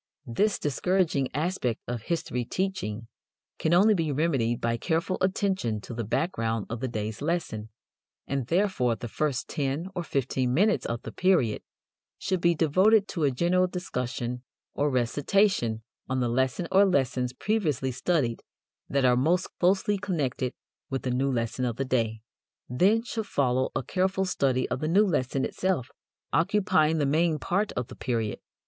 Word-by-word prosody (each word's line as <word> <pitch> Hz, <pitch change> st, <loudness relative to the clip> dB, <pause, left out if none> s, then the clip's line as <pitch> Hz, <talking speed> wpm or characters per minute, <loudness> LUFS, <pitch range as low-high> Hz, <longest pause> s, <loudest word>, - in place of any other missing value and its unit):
This 200 Hz, -, +1 dB
discouraging 150 Hz, -1 st, +1 dB
aspect 150 Hz, -, -1 dB
of 120 Hz, -2 st, -3 dB
history 125 Hz, -4 st, -2 dB
teaching 120 Hz, -, -3 dB, 0.5 s
can 160 Hz, -, +1 dB
only 200 Hz, +5 st, +6 dB
be 165 Hz, -6 st, 0 dB
remedied 135 Hz, -6 st, +1 dB
by 115 Hz, 0 st, 0 dB
careful 165 Hz, +8 st, -1 dB
attention 185 Hz, -, 0 dB
to 120 Hz, -, -8 dB
the 115 Hz, 0 st, -3 dB
background 115 Hz, -, -1 dB
of 120 Hz, -, -3 dB
the 130 Hz, -, -2 dB
day's 110 Hz, -1 st, -4 dB
lesson, 150 Hz, -10 st, -2 dB, 0.6 s
and 135 Hz, -3 st, -2 dB
therefore 170 Hz, -, +1 dB
the 120 Hz, +1 st, -6 dB
first 135 Hz, +2 st, -1 dB
ten 145 Hz, +5 st, -2 dB
or 180 Hz, -, -2 dB
fifteen 130 Hz, -4 st, -1 dB
minutes 210 Hz, +6 st, +2 dB
of 115 Hz, 0 st, -4 dB
the -, -, -6 dB
period 175 Hz, -, +2 dB, 0.6 s
should 185 Hz, -3 st, -1 dB
be 170 Hz, -1 st, +3 dB
devoted 190 Hz, +7 st, +4 dB
to 165 Hz, -5 st, 0 dB
a -, -, +4 dB
general 175 Hz, +7 st, +2 dB
discussion 125 Hz, -8 st, -4 dB, 0.3 s
or 145 Hz, +1 st, +1 dB
recitation 130 Hz, -, +1 dB, 0.3 s
on 130 Hz, 0 st, 0 dB
the 120 Hz, -1 st, +1 dB
lesson 130 Hz, +7 st, 0 dB
or 195 Hz, +1 st, +6 dB
lessons 130 Hz, -8 st, +1 dB
previously 150 Hz, -, -1 dB
studied 130 Hz, -3 st, 0 dB, 0.5 s
that 140 Hz, -1 st, +2 dB
are 125 Hz, -1 st, +5 dB
most 165 Hz, +8 st, +1 dB
closely 190 Hz, +3 st, +2 dB
connected 145 Hz, -10 st, -1 dB, 0.4 s
with 135 Hz, -1 st, -3 dB
the 130 Hz, -, -1 dB
new 135 Hz, +2 st, +1 dB
lesson 120 Hz, +1 st, -2 dB
of 120 Hz, -2 st, -1 dB
the 135 Hz, -, -2 dB
day. 115 Hz, -4 st, -1 dB, 0.4 s
Then 195 Hz, -, +3 dB
should 225 Hz, -3 st, -4 dB
follow 130 Hz, -4 st, +1 dB
a -, -, -1 dB
careful 190 Hz, +3 st, 0 dB
study 135 Hz, -8 st, +1 dB
of -, -, -2 dB
the 155 Hz, -, -2 dB
new 195 Hz, +6 st, +4 dB
lesson 135 Hz, -7 st, 0 dB
itself, 180 Hz, -9 st, -1 dB, 0.4 s
occupying 165 Hz, -3 st, +3 dB
the 145 Hz, -, +1 dB
main 155 Hz, +3 st, +2 dB
part 200 Hz, +8 st, 0 dB
of 125 Hz, -, -2 dB
the -, -, -11 dB
period. 115 Hz, -4 st, -2 dB
140 Hz, 160 wpm, -27 LUFS, 125-185 Hz, 0.6 s, only